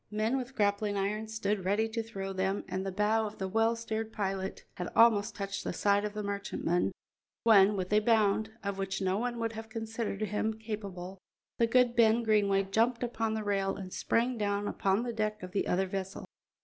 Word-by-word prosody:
Men 215 Hz, +4 st, 0 dB
with 260 Hz, 0 st, -4 dB
grappling 205 Hz, -1 st, +1 dB
irons 215 Hz, +3 st, -2 dB
stood 205 Hz, -2 st, -1 dB
ready 205 Hz, +4 st, +1 dB
to 230 Hz, +1 st, -2 dB
throw 195 Hz, -4 st, -5 dB
them, 190 Hz, +1 st, -1 dB
and 190 Hz, 0 st, -3 dB
the 195 Hz, -, -3 dB
bow 215 Hz, +3 st, +1 dB
of 210 Hz, -, -10 dB
the 190 Hz, -, -2 dB
well 225 Hz, +4 st, +2 dB
steered 225 Hz, -1 st, -4 dB
pirate 195 Hz, -3 st, -3 dB
had 180 Hz, -, -3 dB
almost 220 Hz, -2 st, +5 dB
touched 195 Hz, -1 st, -4 dB
the -, -, -3 dB
side 205 Hz, +2 st, +2 dB
of 210 Hz, 0 st, -5 dB
the 210 Hz, -, -3 dB
merchantman, 200 Hz, -3 st, -1 dB, 0.5 s
when, 210 Hz, -2 st, +6 dB
with 185 Hz, +1 st, -2 dB
a 210 Hz, -, +6 dB
bound, 220 Hz, -1 st, +2 dB
of 200 Hz, -1 st, -3 dB
which 195 Hz, 0 st, -2 dB
no 190 Hz, +1 st, 0 dB
one 240 Hz, 0 st, -2 dB
would 230 Hz, -1 st, -2 dB
have 225 Hz, 0 st, -8 dB
considered 225 Hz, -2 st, -4 dB
him 215 Hz, +1 st, -1 dB
capable, 200 Hz, -4 st, -6 dB, 0.4 s
the 230 Hz, -, +4 dB
good 245 Hz, 0 st, +3 dB
Ben 230 Hz, 0 st, +4 dB
Greenway 200 Hz, -3 st, +3 dB
jumped 230 Hz, +5 st, +1 dB
upon 225 Hz, -2 st, -1 dB
the 220 Hz, -, -2 dB
rail 195 Hz, -1 st, 0 dB
and 185 Hz, -2 st, -8 dB
sprang 240 Hz, +1 st, 0 dB
down 205 Hz, 0 st, 0 dB
upon 195 Hz, +3 st, +1 dB
the 240 Hz, -1 st, -3 dB
deck 215 Hz, -2 st, -2 dB
of 185 Hz, -, -7 dB
the 195 Hz, -, -1 dB
other 190 Hz, +2 st, +2 dB
vessel. 190 Hz, 0 st, -5 dB
210 Hz, 200 wpm, -31 LUFS, 195-225 Hz, 0.5 s, when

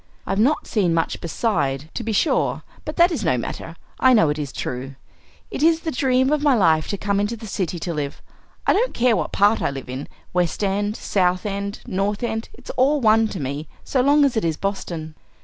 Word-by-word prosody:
"I've 195 Hz, +2 st, -1 dB
not 275 Hz, +8 st, +2 dB
seen 180 Hz, -6 st, +1 dB
much 165 Hz, -, -1 dB
beside, 155 Hz, -, -1 dB
to -, -, -3 dB
be 225 Hz, -, -2 dB
sure, 220 Hz, +9 st, +1 dB, 0.2 s
but 305 Hz, -, -5 dB
that 345 Hz, +2 st, +5 dB
is -, -, -2 dB
no -, -, +2 dB
matter; -, -, -5 dB, 0.2 s
I 260 Hz, 0 st, +6 dB
know 190 Hz, -10 st, +5 dB
it 150 Hz, +1 st, -1 dB
is 145 Hz, -3 st, -4 dB
true. 130 Hz, +2 st, -5 dB, 0.6 s
It -, -, -4 dB
is 325 Hz, +1 st, +4 dB
the 320 Hz, -, -2 dB
dream 260 Hz, 0 st, +2 dB
of 300 Hz, -1 st, +2 dB
my 290 Hz, -3 st, +4 dB
life 160 Hz, -7 st, +3 dB
to 200 Hz, -, -2 dB
come 200 Hz, 0 st, 0 dB
into 205 Hz, +3 st, -1 dB
the 220 Hz, -, -9 dB
city 185 Hz, -4 st, -2 dB
to 170 Hz, +1 st, -3 dB
live. 145 Hz, -2 st, -4 dB, 0.5 s
I -, -, +4 dB
don't -, -, +1 dB
care 235 Hz, -1 st, +3 dB
what -, -, -2 dB
part 205 Hz, +3 st, +3 dB
I -, -, +1 dB
live 135 Hz, -2 st, -7 dB
in, 130 Hz, +3 st, -5 dB, 0.3 s
West 180 Hz, +2 st, 0 dB
End, 205 Hz, +2 st, 0 dB
South 180 Hz, -1 st, +1 dB
End, 200 Hz, 0 st, -3 dB
North 205 Hz, -1 st, -1 dB
End; 225 Hz, -1 st, -2 dB
it's -, -, -9 dB
all 280 Hz, +4 st, +2 dB
one 225 Hz, -2 st, +4 dB
to 195 Hz, -, -6 dB
me, 140 Hz, +2 st, -4 dB, 0.2 s
so 260 Hz, -, +1 dB
long 285 Hz, +2 st, +5 dB
as 270 Hz, -, +1 dB
it 220 Hz, -, +1 dB
is 160 Hz, -2 st, 0 dB
Boston!" 170 Hz, -5 st, -4 dB
205 Hz, 220 wpm, -22 LUFS, 165-250 Hz, 0.6 s, I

